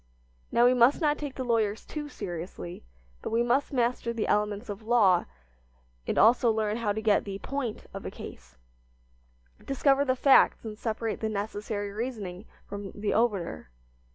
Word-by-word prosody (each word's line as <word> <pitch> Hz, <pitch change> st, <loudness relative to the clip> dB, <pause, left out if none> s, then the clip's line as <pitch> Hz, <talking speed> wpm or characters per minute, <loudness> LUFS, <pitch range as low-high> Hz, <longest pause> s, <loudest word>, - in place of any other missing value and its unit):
Now, 235 Hz, -, +5 dB
we 250 Hz, -, +6 dB
must 250 Hz, +3 st, +5 dB
not 300 Hz, -3 st, +1 dB
take 290 Hz, -3 st, -5 dB
the 260 Hz, -, -3 dB
lawyers 225 Hz, -3 st, 0 dB
too 295 Hz, -1 st, -6 dB
seriously, 175 Hz, -, -7 dB, 0.4 s
but -, -, -4 dB
we 230 Hz, +2 st, +2 dB
must 250 Hz, +4 st, +1 dB
master 240 Hz, -2 st, 0 dB
the 230 Hz, -2 st, -2 dB
elements 210 Hz, +2 st, 0 dB
of 205 Hz, 0 st, -6 dB
law 215 Hz, -6 st, +4 dB, 0.8 s
and -, -, -1 dB
also 235 Hz, +1 st, +5 dB
learn 215 Hz, -1 st, 0 dB
how 225 Hz, -3 st, 0 dB
to 220 Hz, +2 st, -3 dB
get 210 Hz, -2 st, +3 dB
the 195 Hz, -1 st, -5 dB
"point" 255 Hz, 0 st, -4 dB
of -, -, -6 dB
a -, -, -4 dB
case, -, -, -11 dB, 1.1 s
discover 275 Hz, +1 st, +2 dB
the 260 Hz, -2 st, +1 dB
facts 265 Hz, -2 st, +5 dB
and 215 Hz, -1 st, -5 dB
separate 225 Hz, 0 st, -3 dB
the 220 Hz, -, -1 dB
necessary 205 Hz, 0 st, -3 dB
reasoning 210 Hz, -4 st, -5 dB, 0.2 s
from 200 Hz, -1 st, -7 dB
the 205 Hz, 0 st, -1 dB
obiter. 195 Hz, -, 0 dB
220 Hz, 165 wpm, -28 LUFS, 205-245 Hz, 1.1 s, we